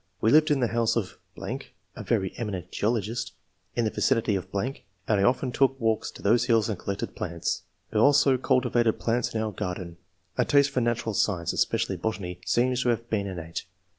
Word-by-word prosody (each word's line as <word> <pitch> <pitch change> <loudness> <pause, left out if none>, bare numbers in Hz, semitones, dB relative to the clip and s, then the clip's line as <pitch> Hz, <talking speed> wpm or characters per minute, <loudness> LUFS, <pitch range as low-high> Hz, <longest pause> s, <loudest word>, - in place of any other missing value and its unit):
We 110 - +3
lived 155 +3 +6
in 145 -3 +2
the 120 - +2
house 115 -1 +2
of.... 105 -5 -3 0.2
[a - - -8
very 95 -1 0
eminent 100 -7 -4
geologist], 115 +2 -1 0.4
in 120 - +1
the 110 - 0
vicinity 115 -5 +1
of...., 95 - -3
and 115 +7 -1
T - - -20 0.4
often 125 +3 +2
took 135 +1 +2
walks 110 -2 0
to - - -12
those 115 +4 +4
hills 115 -3 +3
and 100 -5 -3
collected 100 0 -4
plants. 85 0 -2 0.3
I - - 0
also 140 +3 +5
culti 125 0 +1
vated 120 -2 +3
plants 120 +1 0
in - - +1
our 110 - -2
garden. 90 -2 -5 0.4
A - - +6
taste 140 0 +4
for 130 - 0
natural 115 -1 0
science, 90 -5 0
especially - - 0
botany, 90 -5 -4
seems 125 +1 +2
to 125 - +1
have 115 0 -1
been 100 -3 0
innate. 85 -3 -5
115 Hz, 195 wpm, -27 LUFS, 100-125 Hz, 0.4 s, lived